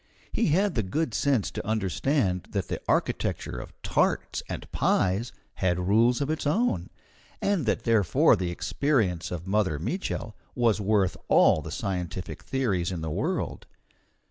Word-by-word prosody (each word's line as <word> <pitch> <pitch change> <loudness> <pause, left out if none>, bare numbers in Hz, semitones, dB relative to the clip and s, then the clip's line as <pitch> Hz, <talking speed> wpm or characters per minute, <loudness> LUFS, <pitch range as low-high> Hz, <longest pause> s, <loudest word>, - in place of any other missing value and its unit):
He 230 - +1
had 190 +5 +2
the 115 - +1
good 150 +12 -2
sense 135 -8 +1
to - - -5
understand 105 - 0
that 100 -3 -2
the - - -3
architecture 60 - -1
of - - -8
tarts - - +1
and - - -5
pies 95 +6 +1 0.2
had 90 -2 0
rules 115 +6 +4
of 140 - -1
its 155 -2 -2
own, 235 +11 +1 0.5
and 195 - 0
that - - +1
therefore 110 -7 +4
the 90 -1 -2
experience 95 - 0
of 90 -1 -5
Mother 95 -5 +1
Mitchel 115 - -3 0.2
was 115 -4 +2
worth 100 -2 +2
all - - +5
the - - -7
scientific 90 -1 -4
theories 100 -10 -1
in 85 -3 -4
the 80 -1 -3
world. - - -2
105 Hz, 150 wpm, -27 LUFS, 90-135 Hz, 0.5 s, all